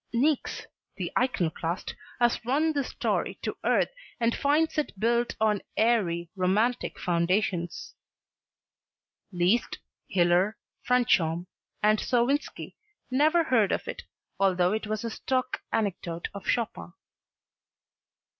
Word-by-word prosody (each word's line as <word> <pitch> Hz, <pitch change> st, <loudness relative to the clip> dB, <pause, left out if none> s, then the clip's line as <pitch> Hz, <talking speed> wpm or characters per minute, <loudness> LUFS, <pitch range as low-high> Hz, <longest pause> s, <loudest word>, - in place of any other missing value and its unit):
Niecks, 280 Hz, +4 st, +1 dB, 0.3 s
the -, -, -3 dB
iconoclast, 180 Hz, -8 st, -1 dB, 0.3 s
has 240 Hz, 0 st, +2 dB
run 295 Hz, +7 st, +1 dB
this 280 Hz, -3 st, -1 dB
story -, -, -1 dB
to -, -, -2 dB
earth -, -, +2 dB, 0.3 s
and 230 Hz, -1 st, +2 dB
finds 305 Hz, +3 st, +2 dB
it 285 Hz, -9 st, -4 dB
built 235 Hz, +2 st, +1 dB
on 215 Hz, -2 st, +2 dB, 0.2 s
airy, 175 Hz, -7 st, +1 dB
romantic 205 Hz, +6 st, +1 dB
foundations. 175 Hz, 0 st, 0 dB, 1.4 s
Liszt, 185 Hz, +6 st, +1 dB, 0.3 s
Hiller, 180 Hz, +4 st, +3 dB, 0.2 s
Franchomme 180 Hz, -9 st, +2 dB, 0.4 s
and 215 Hz, 0 st, +4 dB
Sowinski 255 Hz, +4 st, 0 dB, 0.4 s
never 310 Hz, +6 st, +4 dB
heard 230 Hz, -9 st, +3 dB
of -, -, -1 dB
it -, -, -5 dB, 0.4 s
although 185 Hz, -1 st, +3 dB
it 220 Hz, 0 st, -2 dB
was 215 Hz, +1 st, -2 dB
a 230 Hz, -, -3 dB
stock 255 Hz, +2 st, -2 dB
anecdote 180 Hz, -6 st, -2 dB
of 200 Hz, -, -8 dB
Chopin. 90 Hz, -, -1 dB
215 Hz, 110 wpm, -28 LUFS, 180-250 Hz, 1.4 s, and